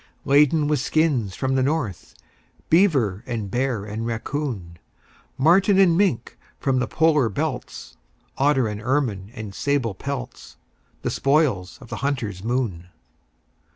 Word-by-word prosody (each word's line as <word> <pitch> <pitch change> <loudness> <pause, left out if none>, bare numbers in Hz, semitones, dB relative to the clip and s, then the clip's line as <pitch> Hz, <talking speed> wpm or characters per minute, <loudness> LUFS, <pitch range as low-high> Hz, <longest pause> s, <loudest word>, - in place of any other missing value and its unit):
Laden 145 +2 +4
with 150 -2 +1
skins 135 - +1
from 130 0 -1
the 130 - +2
north, 130 - -2 0.6
Beaver 140 - +3
and 110 -5 -4
bear 120 -4 -1
and 110 +2 -5
raccoon, 115 - -4 0.6
Marten 185 +7 +4
and 185 -4 +5
mink 170 - 0 0.2
from 135 -2 +1
the 125 - -1
polar 150 -7 +3
belts, 140 +4 -5 0.4
Otter 135 -3 +2
and 105 -1 -5
ermine 120 -8 -1
and 110 -4 -7
sable 140 -3 0
pelts 130 +3 -7 0.5
The - - -1
spoils 135 - +1
of 120 - -13
the - - -5
hunter's 115 -9 -3
moon. 110 -8 -2
130 Hz, 130 wpm, -23 LUFS, 110-150 Hz, 0.6 s, and